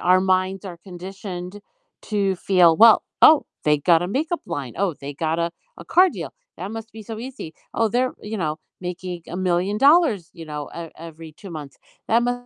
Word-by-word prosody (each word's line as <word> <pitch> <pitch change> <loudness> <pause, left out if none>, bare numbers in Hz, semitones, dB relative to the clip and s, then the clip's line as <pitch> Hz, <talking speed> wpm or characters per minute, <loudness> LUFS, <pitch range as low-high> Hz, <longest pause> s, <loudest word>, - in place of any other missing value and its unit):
Our 185 +1 +4
minds 185 +1 +1
are 180 -3 -7
conditioned 185 +1 -8 0.4
to 200 -3 0
feel, 180 -3 +4
"Well, 225 +2 +7 0.2
oh, 310 -2 +8 0.2
they 150 -1 +3
got 165 +2 +4
a - - -1
makeup 305 - -1
line, 145 -8 -5
oh, 195 -4 +1
they 140 +1 -6
got 160 +2 -1
a 170 0 0 0.3
a 170 - -10
car 365 - +5
deal, - - -6 0.3
that 190 - -5
must 225 0 -7
be 220 - -9
so 220 +1 -7
easy. 240 -9 -8 0.2
Oh, 225 -1 +2
they're, 250 +3 +1
you 215 +1 -5
know, 155 -5 -2 0.2
making 180 -1 -5
$1,000,000, 195 - +2
you 165 -2 -10
know, 150 -2 -6
e - - -4 0.3
every 160 0 -11
2 195 - -9
months. 150 -4 -8 0.3
That 230 +2 +4
mu 245 0 +1
185 Hz, 190 wpm, -22 LUFS, 170-220 Hz, 0.4 s, oh